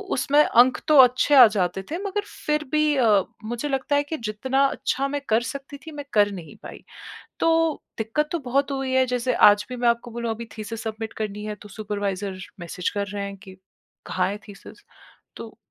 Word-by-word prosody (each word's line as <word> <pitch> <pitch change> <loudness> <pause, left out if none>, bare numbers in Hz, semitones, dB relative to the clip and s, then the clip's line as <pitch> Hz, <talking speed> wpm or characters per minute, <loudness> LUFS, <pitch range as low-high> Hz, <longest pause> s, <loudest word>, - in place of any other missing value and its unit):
उसमें 290 +3 +4
अंक 250 +2 +4
तो 305 - +5
अच्छे 255 +3 +4
आ 255 -3 +11
जाते 190 -3 -1
थे 330 - -1
मगर 405 +1 -2 0.3
फिर 300 0 +1
भी 305 -1 +2
अ, 215 -6 +4 0.2
मुझे 240 +6 -3
लगता 270 +1 0
है 285 - +2
कि 310 +2 -5
जितना 255 +5 -1
अच्छा 275 0 -1
मैं 285 +1 -3
कर 220 +1 +3
सकती 280 +1 -7
थी 320 - -8
मैं 290 -2 -7
कर 205 -2 +4
नहीं 175 -5 -9
पाई। - - -10 0.6
तो 330 - +3 0.5
दिक्कत 230 +8 -1
तो 340 - 0
बहुत 275 +3 +1
हुई 270 -1 -2
है 260 0 +4
जैसे 250 0 -1 0.2
आज 205 0 0
भी 250 - -6
मैं 240 -1 +1
आपको 235 +1 0
बोलूँ 235 0 -4
अभी 225 +1 -5
थीसिस 215 +1 -6
सबमिट 220 0 -5
करनी 210 0 -5
है 210 0 -4
तो 210 - -12
सुपरवाइज़र 200 -2 -4 0.2
मैसेज़ 175 +1 -3
कर 200 -1 -1
रहे 205 -1 -4
हैं 200 0 -6
कि 190 -2 -14 0.5
कहाँ 185 0 0
है 205 - -5
थीसिस? 200 - -13 0.5
तो 225 -1 -9
235 Hz, 200 wpm, -24 LUFS, 205-275 Hz, 0.6 s, आ